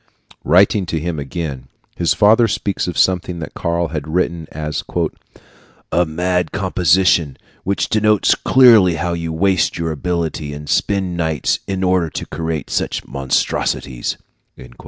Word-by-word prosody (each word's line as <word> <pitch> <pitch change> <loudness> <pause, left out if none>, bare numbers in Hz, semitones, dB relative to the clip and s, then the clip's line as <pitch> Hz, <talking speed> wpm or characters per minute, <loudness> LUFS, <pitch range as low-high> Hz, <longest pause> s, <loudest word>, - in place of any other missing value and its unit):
Writing 95 +1 +3
to 80 - -2
him 80 -1 -3
again, 70 -3 -5 0.3
his 85 - +1
father 110 +3 +5
speaks 100 -2 -2
of 90 - -4
something 90 -1 +1
that 80 - -7
Karl 85 0 -1
had 75 -1 -5
written 85 -1 -1
as 75 0 -4 1.1
"a 85 +1 +2
mad 90 +3 -1
composition, 90 -5 +2 0.3
which 100 +1 -1
denotes 105 -1 +3
clearly 115 -9 +5
how 85 +2 -2
you 85 -1 -3
waste 95 +2 +1
your 80 -1 -2
ability 80 -2 -3
and 75 0 -9
spend 95 -1 0
nights 80 -3 0
in 95 -1 -2
order 90 -3 +2
to - - -5
create 80 -2 -4
such - - -2
monstrosities." 65 -1 -2
85 Hz, 135 wpm, -18 LUFS, 80-95 Hz, 1.1 s, father